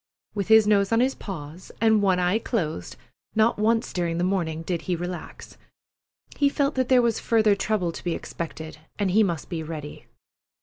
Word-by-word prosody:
With 200 Hz, -3 st, -2 dB
his 220 Hz, -1 st, +7 dB
nose 200 Hz, -1 st, +3 dB
on 225 Hz, -, +3 dB
his 260 Hz, +2 st, +2 dB
paws 165 Hz, -2 st, -8 dB
and 220 Hz, -1 st, +4 dB
one 190 Hz, -2 st, +3 dB
eye 180 Hz, +4 st, +2 dB
closed, 160 Hz, -, -3 dB, 0.4 s
not 220 Hz, 0 st, +3 dB
once 225 Hz, +1 st, +1 dB
during 170 Hz, -2 st, -1 dB
the 175 Hz, -, 0 dB
morning 170 Hz, -4 st, -1 dB
did 170 Hz, 0 st, -2 dB
he 180 Hz, -, +2 dB
relax. 175 Hz, +1 st, -7 dB, 0.8 s
He 285 Hz, -1 st, +4 dB
felt 280 Hz, +1 st, 0 dB
that 260 Hz, -1 st, -1 dB
there 255 Hz, -2 st, +5 dB
was 230 Hz, -2 st, +1 dB
further 220 Hz, -2 st, +3 dB
trouble 200 Hz, -3 st, -1 dB
to -, -, -9 dB
be 175 Hz, -2 st, -1 dB
expected, 160 Hz, -2 st, -7 dB, 0.2 s
and 200 Hz, -3 st, 0 dB
he 215 Hz, +4 st, +4 dB
must 170 Hz, -7 st, -1 dB
be 170 Hz, -3 st, -4 dB
ready. 155 Hz, -2 st, -8 dB
195 Hz, 185 wpm, -25 LUFS, 170-220 Hz, 0.8 s, his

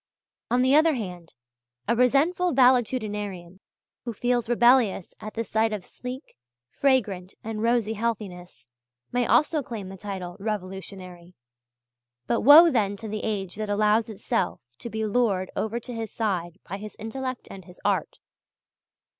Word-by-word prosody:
On 245 Hz, +2 st, +3 dB
the 260 Hz, +1 st, +3 dB
other 315 Hz, 0 st, +5 dB
hand, 180 Hz, -7 st, -7 dB, 0.5 s
a 235 Hz, -, +2 dB
resentful 295 Hz, +9 st, +2 dB
valetudinarian, 210 Hz, -8 st, +1 dB, 0.4 s
who 235 Hz, -, -4 dB
feels 240 Hz, +1 st, 0 dB
rebellious 240 Hz, -5 st, +3 dB
at 215 Hz, 0 st, -8 dB
the 230 Hz, -, -1 dB
sight 220 Hz, 0 st, +1 dB
of 210 Hz, -3 st, -4 dB
sleek, 255 Hz, +3 st, -9 dB, 0.4 s
fragrant 205 Hz, -9 st, 0 dB
and 220 Hz, -1 st, -4 dB
rosy 230 Hz, -1 st, +1 dB
healthiness, 200 Hz, -, -4 dB, 0.5 s
may 245 Hz, -1 st, +1 dB
also 305 Hz, 0 st, +3 dB
claim 220 Hz, -7 st, -7 dB
the 195 Hz, -, -9 dB
title 185 Hz, -2 st, -6 dB
"revolutionary"; 185 Hz, -3 st, -6 dB, 0.9 s
but 235 Hz, -, 0 dB
woe 315 Hz, +6 st, +9 dB
then 205 Hz, -5 st, +1 dB
to 220 Hz, -, -7 dB
the 215 Hz, 0 st, -4 dB
age 200 Hz, -4 st, -3 dB
that 215 Hz, -1 st, -3 dB
allows 215 Hz, +2 st, +2 dB
itself 190 Hz, -3 st, -2 dB, 0.2 s
to 235 Hz, -, -6 dB
be 220 Hz, -1 st, -2 dB
lured 205 Hz, -4 st, +1 dB
over 220 Hz, +2 st, -2 dB
to 245 Hz, +1 st, -8 dB
his 225 Hz, -2 st, -5 dB
side 180 Hz, -6 st, -2 dB
by 195 Hz, -, -4 dB
his 210 Hz, +1 st, -9 dB
intellect 255 Hz, +3 st, -5 dB
and 190 Hz, -2 st, -10 dB
his 180 Hz, -1 st, -15 dB
art. -, -, 0 dB
220 Hz, 145 wpm, -26 LUFS, 195-245 Hz, 0.9 s, woe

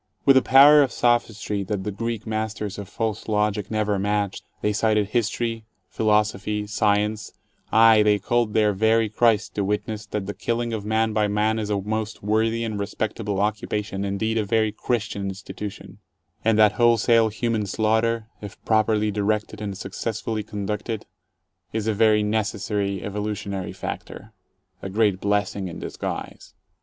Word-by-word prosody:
With 135 Hz, -, +7 dB
a 130 Hz, -, +6 dB
power 145 Hz, +3 st, +7 dB
of 135 Hz, -3 st, +1 dB
sophistry 115 Hz, -4 st, 0 dB
that 100 Hz, -1 st, -3 dB
the 105 Hz, -, -3 dB
Greek 115 Hz, +2 st, -4 dB
masters 110 Hz, -2 st, -3 dB
of 100 Hz, -2 st, -8 dB
false 110 Hz, -1 st, -3 dB
logic 105 Hz, -1 st, 0 dB
never 105 Hz, -2 st, 0 dB
matched, 100 Hz, 0 st, -1 dB, 0.2 s
they 105 Hz, -, +1 dB
cited 105 Hz, -1 st, +1 dB
history, 115 Hz, 0 st, -1 dB, 0.3 s
philo 105 Hz, -1 st, +3 dB
sophy, 105 Hz, 0 st, -4 dB
science 105 Hz, 0 st, 0 dB, 0.2 s
— -, -, -39 dB, 0.2 s
aye, 110 Hz, -1 st, +6 dB
they 105 Hz, -1 st, +4 dB
called 115 Hz, +2 st, 0 dB
their 105 Hz, -2 st, +3 dB
very 110 Hz, +2 st, +2 dB
Christ 110 Hz, -1 st, +2 dB
to 100 Hz, -, -1 dB
witness 105 Hz, +1 st, -3 dB
that 105 Hz, -1 st, -3 dB
the 100 Hz, -, -4 dB
killing 120 Hz, +1 st, -2 dB
of 110 Hz, -2 st, -3 dB
man 110 Hz, +1 st, +1 dB
by 105 Hz, -1 st, +2 dB
man 105 Hz, +2 st, +1 dB
is 105 Hz, -1 st, -3 dB
a 105 Hz, -1 st, 0 dB
most 110 Hz, +2 st, -4 dB
worthy 110 Hz, +2 st, +1 dB
and 110 Hz, -3 st, -3 dB
respectable 105 Hz, 0 st, -3 dB
occupation, 105 Hz, -1 st, -2 dB
indeed 110 Hz, +3 st, -1 dB
a -, -, +1 dB
very 110 Hz, +1 st, +1 dB
Christian 105 Hz, -3 st, -2 dB
institution, 95 Hz, +1 st, -8 dB, 0.4 s
and 110 Hz, -1 st, +3 dB
that 105 Hz, -1 st, +6 dB
wholesale 115 Hz, -1 st, +4 dB
human 110 Hz, -1 st, -1 dB
slaughter, 110 Hz, +2 st, +1 dB, 0.2 s
if 105 Hz, -2 st, -9 dB
properly 110 Hz, -1 st, +2 dB
directed 105 Hz, +1 st, -1 dB
and 100 Hz, -2 st, -4 dB
successfully 110 Hz, +3 st, -4 dB
conducted, 105 Hz, +1 st, -4 dB, 0.7 s
is 110 Hz, -1 st, -2 dB
a 110 Hz, -, +1 dB
very 105 Hz, 0 st, +4 dB
necessary 105 Hz, -2 st, -1 dB
evolutionary 100 Hz, -2 st, -4 dB
factor, -, -, -7 dB, 0.5 s
a 95 Hz, -, -5 dB
great 105 Hz, -2 st, +1 dB
blessing 100 Hz, -1 st, 0 dB
in 85 Hz, -, -7 dB
disguise. -, -, -6 dB
105 Hz, 155 wpm, -24 LUFS, 105-110 Hz, 0.7 s, With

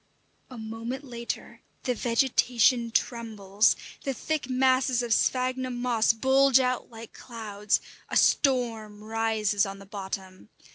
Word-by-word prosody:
A 255 Hz, -, -10 dB
moment 230 Hz, +4 st, -6 dB
later 235 Hz, -3 st, -6 dB, 0.2 s
the 250 Hz, -, 0 dB
vegetation 240 Hz, 0 st, +2 dB
trembles, 220 Hz, -4 st, +1 dB, 0.3 s
the 270 Hz, -2 st, -2 dB
thick 305 Hz, 0 st, -3 dB
masses 255 Hz, -1 st, +2 dB
of 235 Hz, -2 st, +1 dB
sphagnum 255 Hz, +1 st, 0 dB
moss 240 Hz, -3 st, +2 dB
bulge 265 Hz, +3 st, +4 dB
out 255 Hz, -1 st, -1 dB
like 225 Hz, -1 st, -11 dB
clouds, 210 Hz, -3 st, -2 dB, 0.3 s
a -, -, +1 dB
storm 225 Hz, -6 st, +1 dB
rises 220 Hz, -2 st, 0 dB
on 195 Hz, -1 st, -4 dB
the 195 Hz, -, -13 dB
bottom. 190 Hz, 0 st, -7 dB
235 Hz, 125 wpm, -27 LUFS, 215-255 Hz, 0.3 s, bulge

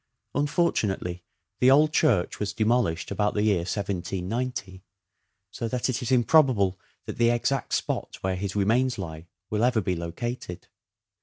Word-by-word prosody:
Unfortunately 110 Hz, -, 0 dB, 0.4 s
the 125 Hz, -, +5 dB
old 150 Hz, +3 st, +5 dB
church 120 Hz, -, +2 dB
was 105 Hz, -1 st, -2 dB
de 110 Hz, 0 st, 0 dB
molished 110 Hz, -9 st, +1 dB
about 105 Hz, +1 st, 0 dB
the 105 Hz, -, +1 dB
year 105 Hz, -3 st, +3 dB
1790, 95 Hz, +2 st, -3 dB, 0.7 s
so 115 Hz, -, -4 dB
that 125 Hz, +3 st, -1 dB
it 130 Hz, +1 st, -1 dB
is 125 Hz, -, -3 dB
improbable 120 Hz, -, +4 dB, 0.3 s
that -, -, -7 dB
the 115 Hz, 0 st, +5 dB
exact 120 Hz, +3 st, 0 dB
spot -, -, -2 dB
where 95 Hz, 0 st, -1 dB
his 95 Hz, +1 st, -4 dB
remains 120 Hz, +6 st, +2 dB
lie 80 Hz, -3 st, -7 dB, 0.2 s
will 105 Hz, +1 st, +1 dB
ever 125 Hz, -2 st, +3 dB
be 90 Hz, -3 st, -1 dB
located. 90 Hz, +3 st, -5 dB
105 Hz, 150 wpm, -26 LUFS, 95-125 Hz, 0.7 s, the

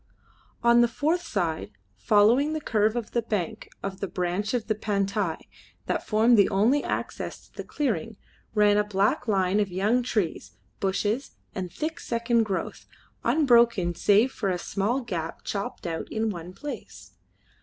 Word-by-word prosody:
On 235 Hz, 0 st, +6 dB
the 240 Hz, -, +5 dB
fourth 305 Hz, +9 st, 0 dB
side, 175 Hz, -, -2 dB, 0.2 s
following 235 Hz, +9 st, +4 dB
the 310 Hz, -, -1 dB
curve 215 Hz, -5 st, +1 dB
of 235 Hz, -3 st, -4 dB
the 235 Hz, -, +1 dB
bank 210 Hz, -7 st, -3 dB
of 195 Hz, -1 st, -4 dB
that 195 Hz, -, -5 dB
branch 185 Hz, +5 st, -1 dB
of 235 Hz, -3 st, -1 dB
the 220 Hz, -, +1 dB
Pantai 200 Hz, -4 st, -1 dB, 0.5 s
that -, -, -2 dB
formed 225 Hz, +1 st, +4 dB
the 200 Hz, -, +5 dB
only 225 Hz, +9 st, +3 dB
access -, -, -4 dB
to -, -, -33 dB
the -, -, -6 dB
clearing, 225 Hz, -, -2 dB, 0.4 s
ran 205 Hz, -1 st, +5 dB
a 210 Hz, -, +4 dB
black 210 Hz, +6 st, 0 dB
line 195 Hz, -1 st, +2 dB
of 205 Hz, -2 st, +1 dB
young 210 Hz, +7 st, +2 dB
trees, 190 Hz, -, -2 dB, 0.3 s
bushes, 205 Hz, +6 st, -1 dB, 0.2 s
and 185 Hz, -2 st, -4 dB
thick 320 Hz, +2 st, -4 dB
second 235 Hz, -1 st, +1 dB
growth, 195 Hz, -3 st, -4 dB, 0.4 s
unbroken 235 Hz, -, +4 dB
save 210 Hz, +8 st, +3 dB
for 200 Hz, -6 st, -2 dB
a 180 Hz, -, 0 dB
small 205 Hz, +8 st, -1 dB
gap 170 Hz, -9 st, -5 dB
chopped 200 Hz, -1 st, -4 dB
out 165 Hz, -1 st, -4 dB
in 220 Hz, 0 st, 0 dB
one 175 Hz, -1 st, -7 dB
place. 290 Hz, +10 st, -8 dB
210 Hz, 160 wpm, -26 LUFS, 195-235 Hz, 0.5 s, On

